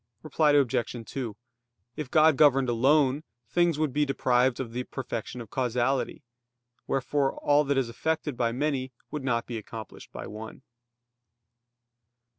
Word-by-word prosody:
Reply 155 Hz, 0 st, +2 dB
Obj. 125 Hz, -4 st, +1 dB
2: 120 Hz, -5 st, -5 dB, 0.6 s
If 150 Hz, -4 st, -5 dB
God 155 Hz, 0 st, +5 dB
governed 135 Hz, -3 st, +4 dB
alone, 135 Hz, +4 st, +3 dB, 0.2 s
things 170 Hz, +4 st, +2 dB
would 155 Hz, -4 st, 0 dB
be 150 Hz, +2 st, +2 dB
deprived 130 Hz, -2 st, +2 dB
of 125 Hz, -4 st, -4 dB
the 125 Hz, +1 st, -2 dB
perfection 125 Hz, -2 st, -5 dB
of 115 Hz, -, -11 dB
causality. 130 Hz, +4 st, 0 dB, 0.6 s
Wherefore 135 Hz, +1 st, 0 dB
all 145 Hz, +1 st, +3 dB
that 140 Hz, 0 st, +1 dB
is 130 Hz, -3 st, +1 dB
effected 155 Hz, +3 st, -2 dB
by 120 Hz, -1 st, +1 dB
many 130 Hz, 0 st, -1 dB, 0.2 s
would 150 Hz, -2 st, -4 dB
not 120 Hz, -3 st, 0 dB
be 120 Hz, -2 st, -4 dB
accomplished 110 Hz, 0 st, -10 dB
by -, -, -7 dB
one. 110 Hz, +1 st, -9 dB
130 Hz, 140 wpm, -27 LUFS, 120-145 Hz, 0.6 s, God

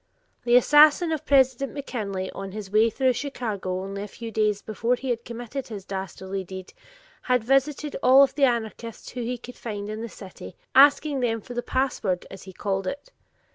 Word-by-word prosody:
The 240 Hz, 0 st, +4 dB
assassin 300 Hz, +6 st, +6 dB
of 315 Hz, -3 st, -3 dB
President 265 Hz, -1 st, +3 dB
McKinley 205 Hz, -9 st, -4 dB
on 195 Hz, -1 st, -7 dB
his 205 Hz, -2 st, -7 dB
way 220 Hz, +2 st, +4 dB
through 260 Hz, +3 st, +1 dB
Chicago 215 Hz, -9 st, -3 dB
only 195 Hz, +1 st, -5 dB
a 205 Hz, -, -5 dB
few 225 Hz, +3 st, -8 dB
days 210 Hz, -2 st, 0 dB
before 230 Hz, +3 st, 0 dB
he 250 Hz, -1 st, -1 dB
committed 240 Hz, +3 st, -7 dB
his 205 Hz, -4 st, -8 dB
dastardly 190 Hz, 0 st, -5 dB
deed 185 Hz, 0 st, -9 dB, 0.5 s
had 250 Hz, -2 st, +1 dB
visited 275 Hz, +4 st, +1 dB
all 265 Hz, +2 st, +7 dB
the 275 Hz, +1 st, +2 dB
anarchists 230 Hz, -2 st, -3 dB
whom 245 Hz, -2 st, -5 dB
he 245 Hz, +1 st, -2 dB
could 245 Hz, +1 st, -11 dB
find 205 Hz, -3 st, -6 dB
in 215 Hz, +1 st, -5 dB
the 230 Hz, -, -5 dB
city, 185 Hz, -3 st, -11 dB, 0.2 s
asking 285 Hz, +1 st, +5 dB
them 230 Hz, -2 st, 0 dB
for 245 Hz, -, -10 dB
"the 245 Hz, -, -2 dB
password" 240 Hz, -9 st, -1 dB
as 195 Hz, -, -9 dB
he 190 Hz, -, -10 dB
called 195 Hz, 0 st, -2 dB
it. 285 Hz, -, -6 dB
230 Hz, 180 wpm, -25 LUFS, 200-265 Hz, 0.5 s, all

